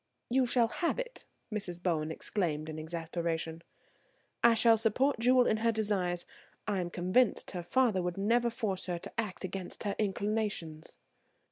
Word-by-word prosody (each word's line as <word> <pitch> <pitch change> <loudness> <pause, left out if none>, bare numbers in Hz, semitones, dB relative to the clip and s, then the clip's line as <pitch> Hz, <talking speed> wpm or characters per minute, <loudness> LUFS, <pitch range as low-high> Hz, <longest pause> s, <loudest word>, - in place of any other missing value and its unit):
"You 255 0 +3
shall 240 -1 +3
have 335 +8 -1
it," - - -5 0.3
Mrs. 190 -5 -2
Bowen 160 -4 0
exclaimed 160 -3 -2
in 155 0 -5
exasperation. 165 0 -3 0.8
"I 235 -1 +7
shall 225 0 +6
support 230 +5 +2
Jewel 250 +1 +5
in 220 - +2
her 230 +1 +2
desires. 195 -5 0 0.4
I 205 -3 0
am 175 -1 -2
convinced 185 +8 +1
her 180 - -4
father 215 +1 +2
would 180 0 -3
never 235 +4 +2
force 215 -6 -3
her 175 -1 -1
to - - -9
act 210 -4 -3
against 185 -1 -5
her 200 -1 -1
inclinations." 205 -6 -2
200 Hz, 155 wpm, -32 LUFS, 175-230 Hz, 0.8 s, I